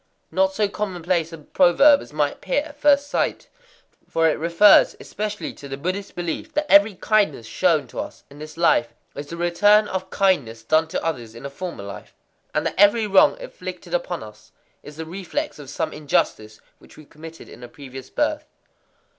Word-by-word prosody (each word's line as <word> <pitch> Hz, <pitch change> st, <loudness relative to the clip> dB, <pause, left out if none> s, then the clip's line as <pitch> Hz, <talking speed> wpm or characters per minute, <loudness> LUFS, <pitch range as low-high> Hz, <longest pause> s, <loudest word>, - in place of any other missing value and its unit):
Not 190 Hz, +3 st, +1 dB
so 210 Hz, 0 st, +1 dB
commonplace 180 Hz, -5 st, -2 dB
a 165 Hz, -, -8 dB
proverb 190 Hz, -, +4 dB
as -, -, -12 dB
might 150 Hz, -1 st, 0 dB
appear 280 Hz, +10 st, -2 dB
at 305 Hz, -1 st, -12 dB
first 285 Hz, -1 st, +4 dB
sight; 290 Hz, -, -2 dB, 0.6 s
for 165 Hz, 0 st, +2 dB
it 155 Hz, -, 0 dB
refers 170 Hz, +5 st, +5 dB
especially 210 Hz, 0 st, -5 dB
to 140 Hz, -, -11 dB
the 135 Hz, 0 st, -6 dB
Buddhist 185 Hz, +7 st, -4 dB
belief 175 Hz, -2 st, -5 dB
that 300 Hz, +1 st, +1 dB
every 200 Hz, 0 st, +6 dB
kindness 195 Hz, -, +1 dB
shown 155 Hz, +5 st, +1 dB
to -, -, -7 dB
us -, -, -7 dB
in 145 Hz, -, -14 dB
this 155 Hz, +1 st, -10 dB
life 160 Hz, -3 st, +2 dB, 0.2 s
is 145 Hz, +2 st, -8 dB
a 170 Hz, -, -6 dB
return 205 Hz, +5 st, +3 dB
of 190 Hz, 0 st, -4 dB
kindness 140 Hz, -, 0 dB
done 155 Hz, +7 st, +2 dB
to -, -, -4 dB
others 120 Hz, -9 st, -4 dB
in 115 Hz, -, -10 dB
a 140 Hz, -, -6 dB
former 170 Hz, -, -7 dB
life, 100 Hz, 0 st, -10 dB, 0.4 s
and -, -, -1 dB
that -, -, -1 dB
every 205 Hz, +3 st, +5 dB
wrong 200 Hz, -, +4 dB
inflicted -, -, -9 dB
upon -, -, -2 dB
us -, -, -15 dB, 0.3 s
is 150 Hz, -, -12 dB
the 160 Hz, -, -5 dB
reflex 195 Hz, -, -5 dB
of 140 Hz, -3 st, -10 dB
some 155 Hz, +2 st, -3 dB
injustice 110 Hz, -7 st, -1 dB, 0.2 s
which -, -, -19 dB
we 155 Hz, -, -14 dB
committed 160 Hz, +2 st, -12 dB
in -, -, -14 dB
a 120 Hz, -, -9 dB
previous 130 Hz, 0 st, -11 dB
birth. -, -, -1 dB
170 Hz, 190 wpm, -22 LUFS, 150-205 Hz, 0.6 s, every